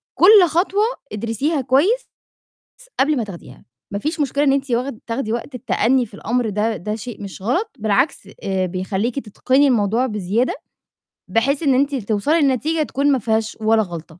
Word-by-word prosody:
كل 385 0 +7
خطوة 380 +6 +1 0.3
ادرسيها 235 +8 -1
كويس 320 - +2 0.7
س - - -17
قبل 290 +2 +3
ما 235 - 0
تاخديها، 170 -9 -11 0.3
ما 200 - -1
فيش 310 +5 -3
مشكلة 285 +1 +1
إن 270 - +4
أنتِ 275 -1 -1
واخد 240 0 -1
تاخدي 230 -1 -2
وقت 240 +3 -4
التأنّي 245 +1 +1
في 205 - -18
الأمر 240 +2 -1
ده 210 +2 0
ده 210 +6 -4
شيء 230 0 -8
مش 195 -1 -8
غلط، 345 - 0
بالعكس 210 +1 0
آآ 190 -1 -1
بيخلّيكِ 190 +7 -2
تِتِقني 260 +6 +1
الموضوع 230 +1 +2
بزيادة 210 +2 -1 0.8
بحيث 275 +7 +1
إن 275 -3 +3
أنتِ 280 +2 +1
ل 260 - -1
توصلي 225 +11 +1
لنتيجة 300 +4 +1
تكون 285 0 0
ما 265 - +1
فيهاش 220 -1 -1
ولا 220 0 +3
غلطة. 170 -2 -9
240 Hz, 175 wpm, -20 LUFS, 210-280 Hz, 0.8 s, كل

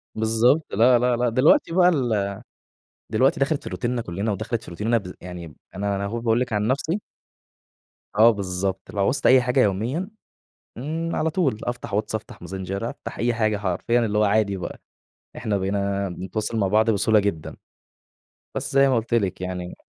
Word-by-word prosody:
بالضبط، 115 +7 +3
لا، 120 +4 +5
لا، 125 0 +2
لا. 120 0 +1
دلوقتي 150 - +3
بقى 180 0 +5
ال 110 - 0 0.8
دلوقتي 130 +5 +2
دخَلِت 140 +2 0
في - - -6
روتيننا 120 0 -2
كُلّنا 100 +2 -3
ودخَلِت 110 +3 -3
في - - -11
روتيننا 110 +7 0
بذ 90 -4 -6
يعني 85 -4 -8 0.2
أنا 100 +1 -1
أنا 100 0 -2
أهو 115 +4 -3
باقول 115 0 +1
لِك 125 -2 -2
عن 105 0 0
نَفْسي 150 - 0 1.2
آه 110 +2 +8
بالضبط، 95 -2 -2
لو 100 - -4
عوزت 135 +8 +1
أي 130 0 +7
حاجة 125 +2 +1
يوميًا، 125 - 0 0.7
امم 160 +6 -3
على 160 - +1
طُول 150 - 0
أفتح 120 -4 -4
واتس، 105 +1 -1
أفتح 110 - -6
ماسنجر، 95 +4 -4
أفتح - - -9
أي 120 0 +1
حاجة 110 -2 +1
حرفيًا 105 +5 0
اللي 105 -1 -1
هو 105 - +4
عادي 100 -1 +2
بقى، 90 - -7 0.6
إحنا 105 -2 -1
بقينا 100 0 -1
بنتواصل 105 +5 -4
مع 100 -3 +2
بعض 110 +3 +3
بسهولة 110 0 +3
جدًا. 100 -7 -3 1.0
بس - - -3
زي 135 0 +5
ما 130 - +2
قُلت 115 +1 -1
لِك 95 -6 0
يعني 90 -1 -5
110 Hz, 180 wpm, -23 LUFS, 100-125 Hz, 1.2 s, آه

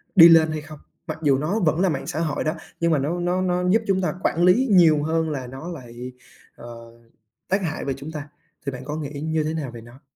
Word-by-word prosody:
đi 170 -2 +10
lên 160 -1 +6
hay 155 -1 -3
không? 155 -1 -11 0.3
Mặc 155 0 -5
dù 140 -2 +4
nó 170 +10 -1
vẫn 160 -2 +1
là 190 - +3
mạng - - -3
xã 155 - -3
hội 155 -3 -1
đó, 155 +2 -1 0.2
nhưng 170 0 +2
mà 150 - +3
nó 165 +6 -2
nó 180 +1 0
nó 180 0 0
giúp 220 +4 +4
chúng 190 -1 +2
ta 155 -4 -1
quản 170 - +1
lý 230 +9 +4
nhiều 160 -5 +5
hơn 160 0 0
là 130 -4 -4
nó 135 +7 -8
lại, 125 -5 -8 0.4
ờ, 120 - -12 0.8
tác 195 +1 +1
hại 160 -2 -3
về 135 - -1
chúng 145 +3 -8
ta, 145 -2 -7 0.4
thì 140 - -1
bạn 125 - -8
có 150 +1 -4
nghĩ 145 -1 -6
như 160 0 0
thế 155 +1 -2
nào 145 -6 -4
về 115 -1 -10
nó? 120 +5 -15
155 Hz, 255 wpm, -23 LUFS, 145-175 Hz, 0.8 s, đi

